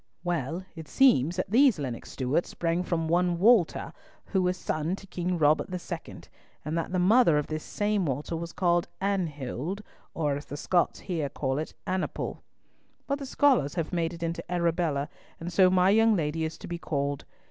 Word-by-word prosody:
Well, 175 Hz, 0 st, -2 dB
it 160 Hz, -2 st, -8 dB
seems 175 Hz, -, +4 dB
that 185 Hz, +1 st, -3 dB
these 255 Hz, -2 st, +5 dB
Lennox 130 Hz, -6 st, -5 dB
Stewarts 135 Hz, +6 st, 0 dB
sprang 170 Hz, +1 st, -1 dB
from 165 Hz, -3 st, -1 dB
one 175 Hz, +1 st, +2 dB
Walter, 205 Hz, -2 st, +3 dB, 0.3 s
who 190 Hz, -, 0 dB
was 180 Hz, 0 st, 0 dB
son 160 Hz, +1 st, -2 dB
to 195 Hz, -, -13 dB
King 180 Hz, -1 st, -2 dB
Robert 155 Hz, +2 st, +3 dB
II., 180 Hz, -1 st, -6 dB, 0.4 s
and 155 Hz, +2 st, -2 dB
that 165 Hz, +1 st, -2 dB
the 185 Hz, -, 0 dB
mother 185 Hz, -2 st, +5 dB
of 150 Hz, -, 0 dB
this 155 Hz, 0 st, -4 dB
same 205 Hz, -4 st, 0 dB
Walter 145 Hz, +5 st, -2 dB
was 170 Hz, +1 st, -5 dB
called 175 Hz, -2 st, +1 dB
Anhild, 175 Hz, -, -2 dB, 0.3 s
or 150 Hz, -3 st, 0 dB
as 145 Hz, -, -6 dB
the 145 Hz, -, -7 dB
Scots 175 Hz, +3 st, +1 dB
here 160 Hz, -7 st, -2 dB
call 135 Hz, 0 st, -2 dB
it 155 Hz, -, -5 dB
Annaple, 185 Hz, 0 st, -3 dB, 0.6 s
but 280 Hz, 0 st, -1 dB
the 275 Hz, -, -6 dB
scholars 255 Hz, -, +3 dB
have 165 Hz, -2 st, -2 dB
made 165 Hz, -1 st, 0 dB
it 170 Hz, -1 st, -7 dB
into 165 Hz, 0 st, -2 dB
Arabella, 170 Hz, -4 st, 0 dB, 0.3 s
and 175 Hz, +2 st, -6 dB
so 185 Hz, +1 st, +6 dB
my 185 Hz, +1 st, +4 dB
young 225 Hz, +1 st, +5 dB
lady 160 Hz, -1 st, -1 dB
is 160 Hz, -, -5 dB
to -, -, -9 dB
be 170 Hz, 0 st, -4 dB
called. 140 Hz, -3 st, -2 dB
170 Hz, 185 wpm, -28 LUFS, 155-185 Hz, 0.6 s, so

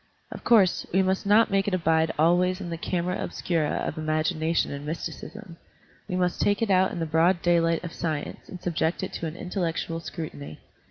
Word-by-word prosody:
Of -, -, -8 dB
cotirse, 205 Hz, -6 st, +3 dB
we 190 Hz, +2 st, +3 dB
must 190 Hz, +2 st, 0 dB
not 215 Hz, +2 st, +5 dB
make 195 Hz, 0 st, +2 dB
it 195 Hz, -, +2 dB
abide 160 Hz, -2 st, +2 dB
always 180 Hz, +4 st, +3 dB
in 175 Hz, -3 st, -6 dB
the -, -, -2 dB
camera 180 Hz, +1 st, -2 dB
obscura 165 Hz, -4 st, -1 dB
of 155 Hz, -, -4 dB
imagination 155 Hz, +1 st, 0 dB
and 140 Hz, 0 st, -6 dB
mysti 155 Hz, +3 st, -4 dB
cism. 210 Hz, -6 st, -10 dB, 0.5 s
We 180 Hz, -, -3 dB
must 180 Hz, -1 st, 0 dB
take 205 Hz, +2 st, +2 dB
it 215 Hz, -, 0 dB
out 185 Hz, 0 st, +4 dB
in -, -, -5 dB
the 165 Hz, -, -1 dB
broad 165 Hz, +3 st, +2 dB
daylight 170 Hz, -1 st, +2 dB
of 170 Hz, -, -6 dB
science 155 Hz, -3 st, -4 dB
and 185 Hz, -, -8 dB
subject 170 Hz, 0 st, -1 dB
it 190 Hz, -, -4 dB
to 165 Hz, -, -3 dB
an 155 Hz, -, -6 dB
intellectual 170 Hz, -3 st, -3 dB
scru 165 Hz, -1 st, -6 dB
tiny. 75 Hz, +2 st, -10 dB
170 Hz, 205 wpm, -26 LUFS, 160-185 Hz, 0.5 s, not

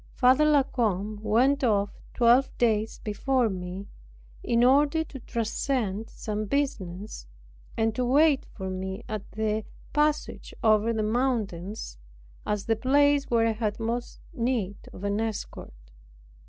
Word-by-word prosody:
Father 260 Hz, +4 st, +5 dB
La 295 Hz, -2 st, +5 dB
Combe 215 Hz, -5 st, -1 dB
went 250 Hz, +7 st, +2 dB
off 205 Hz, -4 st, +2 dB, 0.2 s
twelve 245 Hz, +2 st, +5 dB
days 220 Hz, -2 st, +1 dB
before 240 Hz, +3 st, +1 dB
me, 185 Hz, +1 st, -5 dB, 0.6 s
in 235 Hz, 0 st, +2 dB
order 285 Hz, +5 st, +4 dB
to 280 Hz, -3 st, -10 dB
transact 225 Hz, -2 st, -2 dB
some 215 Hz, 0 st, -4 dB
business, 205 Hz, -, -3 dB, 0.5 s
and 225 Hz, 0 st, +1 dB
to 250 Hz, -, -1 dB
wait 280 Hz, +3 st, +4 dB
for 190 Hz, -2 st, -6 dB
me 190 Hz, +3 st, -5 dB
at 215 Hz, -2 st, -6 dB
the 215 Hz, 0 st, -1 dB, 0.3 s
passage 300 Hz, 0 st, 0 dB
over 220 Hz, 0 st, +4 dB
the 220 Hz, -1 st, -1 dB
mountains, 215 Hz, -, -2 dB, 0.5 s
as 210 Hz, -1 st, -1 dB
the 225 Hz, -, +2 dB
place 285 Hz, +4 st, +3 dB
where 230 Hz, -1 st, +3 dB
I 225 Hz, -, +3 dB
had 215 Hz, -1 st, -2 dB
most 235 Hz, +2 st, -3 dB
need 230 Hz, -5 st, -1 dB
of 185 Hz, -, -11 dB
an 200 Hz, +1 st, 0 dB
escort. -, -, -6 dB
225 Hz, 135 wpm, -27 LUFS, 205-260 Hz, 0.6 s, Father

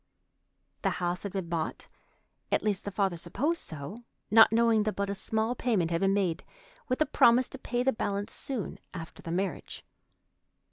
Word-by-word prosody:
The -, -, +2 dB
house 175 Hz, 0 st, -1 dB
had 200 Hz, -, -5 dB
been 190 Hz, -3 st, -3 dB
bought—at 165 Hz, -2 st, -5 dB
least, 210 Hz, -3 st, 0 dB
the -, -, -1 dB
father 195 Hz, -3 st, 0 dB
supposed 300 Hz, -, 0 dB
so—not 215 Hz, +8 st, +2 dB
knowing 230 Hz, -1 st, +4 dB
that 215 Hz, 0 st, -1 dB
but 200 Hz, 0 st, -1 dB
a -, -, 0 dB
small 220 Hz, +3 st, -1 dB
payment 215 Hz, -9 st, 0 dB
had 165 Hz, -, 0 dB
been 195 Hz, 0 st, +3 dB
made, 185 Hz, -5 st, 0 dB, 0.4 s
with 255 Hz, +2 st, -1 dB
a -, -, +6 dB
promise 250 Hz, -3 st, +5 dB
to -, -, -9 dB
pay 245 Hz, -1 st, -1 dB
the 265 Hz, +1 st, +3 dB
balance 200 Hz, -1 st, -2 dB
soon 255 Hz, -8 st, -3 dB, 0.2 s
after 165 Hz, -2 st, -8 dB
the -, -, -8 dB
marriage. 185 Hz, +1 st, -3 dB
200 Hz, 170 wpm, -29 LUFS, 180-235 Hz, 0.4 s, a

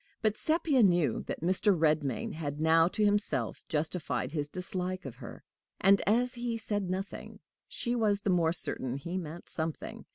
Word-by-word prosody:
But 215 Hz, -1 st, +2 dB
Sepia 310 Hz, -1 st, +2 dB
knew 175 Hz, -7 st, +3 dB
that -, -, -4 dB
Mr. 185 Hz, +3 st, +2 dB
Redmain 150 Hz, -6 st, +1 dB
had 145 Hz, -2 st, -4 dB
now 165 Hz, +1 st, +5 dB
to 210 Hz, +3 st, 0 dB
himself 205 Hz, 0 st, 0 dB
justified 155 Hz, -3 st, -2 dB
his 145 Hz, -2 st, -3 dB
dislike 185 Hz, +1 st, -2 dB
of 125 Hz, -2 st, -7 dB
her; 120 Hz, -3 st, -10 dB, 0.4 s
and, 195 Hz, 0 st, +5 dB
as 245 Hz, +4 st, +3 dB
he 240 Hz, -2 st, -3 dB
said 205 Hz, -4 st, -2 dB
nothing, 190 Hz, +2 st, -5 dB, 0.3 s
she 240 Hz, -, -2 dB
was 205 Hz, -3 st, +2 dB
the 195 Hz, -, +2 dB
more 170 Hz, -3 st, +3 dB
certain 130 Hz, -6 st, -2 dB
he 170 Hz, +6 st, -4 dB
meant 170 Hz, 0 st, -8 dB
something. 160 Hz, -1 st, -3 dB
180 Hz, 165 wpm, -30 LUFS, 155-205 Hz, 0.4 s, now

